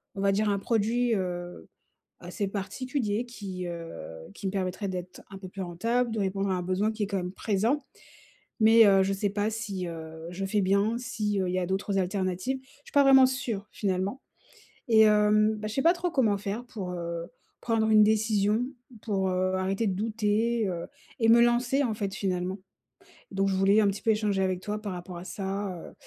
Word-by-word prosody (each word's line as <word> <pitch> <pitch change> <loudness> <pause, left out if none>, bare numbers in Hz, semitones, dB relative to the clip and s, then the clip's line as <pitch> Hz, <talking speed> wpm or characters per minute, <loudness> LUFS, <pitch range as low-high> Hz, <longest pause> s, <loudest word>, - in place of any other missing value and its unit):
on 195 - -4
va 200 0 +3
dire 210 +1 +1
un 200 -1 +1
produit, 230 +3 +1
heu, 175 -2 -4 0.5
assez 205 -3 -4
particulier 215 +3 -2
qui, 195 -7 -6
heu, 170 -1 -6 0.4
qui 195 - -5
me - - -1
permettrait 190 +1 -2
d'être 180 -1 -6
un 195 - -9
peu 190 -1 -9
plus 195 +1 -7
rentable, 230 +8 -1
de 220 - -2
répondre 195 0 -1
à - - +2
un 180 - -1
besoin 185 +4 0
qui 215 -1 -3
est - - -1
quand 200 -1 -2
même 180 0 -4
présent. 225 +9 0 0.8
Mais, 225 +1 +7
heu, 195 -1 +5
je 195 - 0
sais 200 +1 -1
pas 205 +1 0
si, 205 -5 -4
heu, 160 -1 -8
je 185 +2 -4
fais 205 +2 +1
bien, 200 +4 +2
si, 210 -4 -2
heu, 185 - 0
il 180 - -2
y - - +1
a - - -1
d'autres 195 +2 -1
alternatives. 185 +6 -1
Je 265 - -26 0.2
suis - - -14
pas 285 -1 +5
vraiment 265 -1 +8
sûre, 235 -6 -3
finalement 195 +4 -2 0.7
et 220 -1 +6
hem, 215 0 +4
bah, 215 0 -5
je 215 - -5
sais 270 - 0
pas 330 - +6
trop 355 0 -2
comment 230 -10 +2
faire 205 +4 -4
pour, 200 -7 -6
heu, 170 -1 -4 0.4
prendre 225 -2 +1
une 215 -1 +7
décision, 215 0 +2 0.4
pour, 195 -4 -1
heu, 185 0 0
arrêter 195 +4 0
de 195 - 0
douter, 220 +2 0
heu 175 -2 -3 0.3
et 225 - +3
me 235 +1 +7
lancer 240 +3 +3
en 235 -5 0
fait, 200 -2 -3
finalement. 185 -1 -2 0.7
Donc 195 0 +1
je 195 - 0
voulais 195 +3 +4
un 210 - +3
petit 200 0 -3
peu 225 - +2
échanger 210 -3 +1
avec 185 -1 0
toi 210 +2 -4
par 205 -3 -4
rapport 180 0 -7
à 175 - -8
ça, 195 0 -4
heu, - - -14
205 Hz, 210 wpm, -28 LUFS, 190-220 Hz, 0.8 s, vraiment